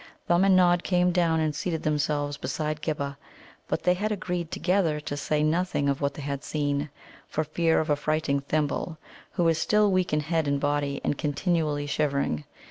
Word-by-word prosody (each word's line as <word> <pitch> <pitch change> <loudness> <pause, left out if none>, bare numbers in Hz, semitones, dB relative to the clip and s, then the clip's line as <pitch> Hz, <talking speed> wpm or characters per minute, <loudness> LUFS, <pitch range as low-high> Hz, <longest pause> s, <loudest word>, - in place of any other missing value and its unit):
Thumb 175 +2 +3
and 195 -1 +5
Nod 175 -1 +4
came 180 -1 +2
down 170 -2 +2
and 155 -1 0
seated 165 +1 -2
themselves 145 -1 0
beside 150 +3 -3
Ghibba, 140 -3 -3 0.5
but - - -2
they 180 - +4
had 210 +4 -2
agreed 180 -4 -3
together 170 -3 +1
to 150 -1 -5
say 150 +1 0
nothing 160 -2 +1
of 140 0 0
what 140 0 0
they 145 - -7
had 140 0 -3
seen, 145 -1 -1 0.4
for 155 - -1
fear 160 +2 +1
of 155 - -1
affrighting 150 -1 +1
Thimble, 155 +3 -1 0.4
who 175 - +1
was 165 -1 +3
still 210 +4 +3
weak 185 -1 +1
in 150 0 +2
head 160 0 0
and 140 0 +1
body, 145 -1 -1
and 145 - -1
continually 150 -1 0
shivering. 140 - 0
155 Hz, 185 wpm, -27 LUFS, 145-175 Hz, 0.5 s, and